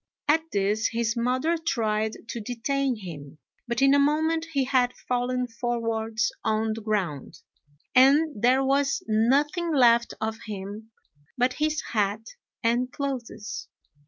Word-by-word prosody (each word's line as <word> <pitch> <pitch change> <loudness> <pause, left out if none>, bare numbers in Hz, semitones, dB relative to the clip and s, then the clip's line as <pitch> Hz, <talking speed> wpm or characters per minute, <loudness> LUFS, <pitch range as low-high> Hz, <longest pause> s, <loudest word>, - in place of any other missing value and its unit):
At 310 +2 +4
this 205 +2 +1
his 230 -1 -1
mother 255 +8 0
tried 220 -7 -1
to 235 - -4
detain 255 +4 -1
him, 155 -8 -9 0.3
but 235 +3 0
in 275 0 +6
a 285 - +5
moment 315 +3 +1
he 275 -2 +2
had 255 -1 +1
fallen 250 0 0
forwards 225 -2 -1
on 220 0 0
the 225 - -7
ground, 195 - -3 0.5
and 275 -1 +4
there 255 +3 +4
was 275 +1 +1
nothing 285 +10 +2
left 235 -5 +4
of 220 +1 -3
him 205 +2 -7 0.5
but 250 +1 +2
his 305 0 -1
hat 210 0 0 0.4
and 240 +2 +1
clothes. 240 -5 -5
240 Hz, 130 wpm, -26 LUFS, 220-275 Hz, 0.5 s, in